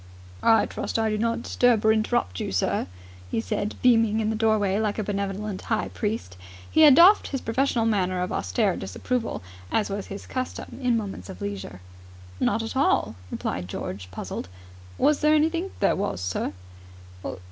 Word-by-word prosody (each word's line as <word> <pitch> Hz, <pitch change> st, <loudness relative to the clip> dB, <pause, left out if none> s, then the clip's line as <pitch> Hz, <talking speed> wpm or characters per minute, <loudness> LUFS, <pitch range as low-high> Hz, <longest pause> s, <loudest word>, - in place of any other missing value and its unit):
"I 225 Hz, -1 st, +5 dB
trust -, -, -3 dB
I 220 Hz, -1 st, +1 dB
do 215 Hz, -, 0 dB
not 230 Hz, +1 st, 0 dB
disturb 240 Hz, -4 st, +2 dB
or 220 Hz, -, +6 dB
interrupt 215 Hz, -, 0 dB
you, -, -, -3 dB
sir," 90 Hz, -1 st, 0 dB, 0.4 s
he -, -, -1 dB
said, 210 Hz, -2 st, -2 dB
beaming 225 Hz, -3 st, +4 dB
in 220 Hz, 0 st, 0 dB
the -, -, -1 dB
doorway 215 Hz, -3 st, +2 dB
like 215 Hz, -2 st, -1 dB
a 215 Hz, -, -1 dB
benevolent 200 Hz, 0 st, -3 dB
high 220 Hz, -2 st, -1 dB
priest. 210 Hz, -, -3 dB, 0.3 s
He 315 Hz, -, +4 dB
had 295 Hz, -4 st, +9 dB
doffed 360 Hz, +7 st, +7 dB
his 270 Hz, -, -3 dB
professional 235 Hz, 0 st, +1 dB
manner 185 Hz, -4 st, +1 dB
of 180 Hz, -, -4 dB
austere 95 Hz, +1 st, 0 dB
disapproval, 225 Hz, -, -3 dB, 0.3 s
as 210 Hz, -2 st, +1 dB
was 200 Hz, 0 st, -4 dB
his 200 Hz, -, -7 dB
custom 255 Hz, 0 st, -5 dB
in 245 Hz, -2 st, +2 dB
moments 195 Hz, -, -5 dB
of 90 Hz, -, -8 dB
leisure. 95 Hz, -2 st, -6 dB, 0.6 s
"Not 225 Hz, +2 st, +1 dB
at 225 Hz, -, -5 dB
all," 265 Hz, -, +2 dB, 0.2 s
replied 90 Hz, 0 st, -3 dB
George, 95 Hz, 0 st, -6 dB
puzzled. 90 Hz, -1 st, -6 dB, 0.5 s
"Was 300 Hz, 0 st, +3 dB
there 305 Hz, 0 st, +4 dB
anything.. 330 Hz, +4 st, +1 dB
.?" -, -, -19 dB
"There 195 Hz, -, +3 dB
was, 195 Hz, -, -2 dB
sir." 90 Hz, +2 st, -2 dB
215 Hz, 175 wpm, -25 LUFS, 185-235 Hz, 0.6 s, had